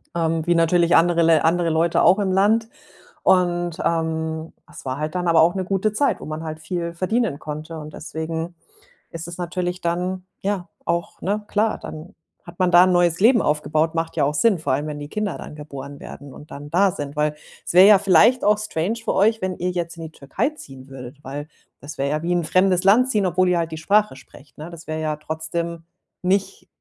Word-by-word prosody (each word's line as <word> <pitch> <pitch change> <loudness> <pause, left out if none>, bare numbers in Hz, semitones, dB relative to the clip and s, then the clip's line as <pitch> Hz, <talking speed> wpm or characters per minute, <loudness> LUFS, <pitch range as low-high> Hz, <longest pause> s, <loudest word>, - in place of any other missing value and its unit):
ähm, 165 -1 0
wie 175 - +3
natürlich 170 +1 +3
andere 170 0 +3
Lä 165 -1 +5
andere 170 +2 +2
Leute 165 +1 +2
auch 190 - +5
im 195 -2 0
Land. 215 +4 +3 0.6
Und, 175 -2 +2
ähm, 160 -1 -2 0.2
es - - -12
war 130 0 -3
halt 155 +3 -4
dann 180 -1 -1
aber 165 - +4
auch 170 +3 +3
'ne 190 - -1
gute 195 +3 0
Zeit, 280 +6 +1
wo - - -9
man 155 +1 -5
halt 155 -1 -6
viel 170 +1 -4
verdienen 185 -2 -1
konnte. 155 +2 -7
Und 150 0 -9
deswegen 160 +2 -5 0.6
ist 165 0 -7
es 175 - -8
natürlich 180 0 -3
dann 180 +2 -2 0.2
ja 195 -3 -2 0.2
auch, 170 0 -2
ne, 205 +2 -2
klar, 215 +1 0
dann 160 +6 -9 0.3
hat 170 0 -13
man 185 -1 +3
da 175 0 +8
'n 185 - +3
neues 175 -1 +2
Leben 235 +1 +5
aufgebaut. 155 +2 0
Macht 165 0 -3
ja - - +3
auch 145 - 0
Sinn, 195 +4 +2
vor 155 - -1
allem, 145 +3 -1
wenn 150 -1 -5
die 145 - -7
Kinder 210 -1 -3
dann - - -9
geboren 140 -1 -9
werden 140 -2 -10
und 150 - -14
dann 145 +1 -9
da 190 +4 +3
sind. 145 -3 -6
Weil, 150 0 +1 0.3
es - - -3
wäre 185 +3 +8
ja 210 - +8
vielleicht 205 +6 +4
auch 210 0 +4
strange 210 0 -2
für - - 0
euch, 220 +3 +2
wenn 185 -1 -2
ihr 180 - -1
jetzt 170 -1 -4
in 165 - -7
die 160 - -8
Türkei 140 - -2
ziehen 135 - -13
würdet, 135 +1 -10
weil 145 +3 -6 0.3
das 145 +2 -9
wäre 140 +1 -1
ja 155 +1 -1
wie 175 +1 0
in 175 - +2
'n - - -6
fremdes 185 +1 +2
Land 220 +7 +5
ziehen, 210 -6 +1
obwohl 185 +1 +2
ihr 180 - +2
halt 165 -1 -2
die 160 - -5
Sprache 200 -1 +2
sprecht, 135 +2 -17
ne? 155 +3 -8
Das 170 -1 -11
wäre 155 0 -3
ja 155 -1 -1
trotzdem 160 +2 -4 0.4
nicht 195 - -1
170 Hz, 225 wpm, -22 LUFS, 155-185 Hz, 0.6 s, da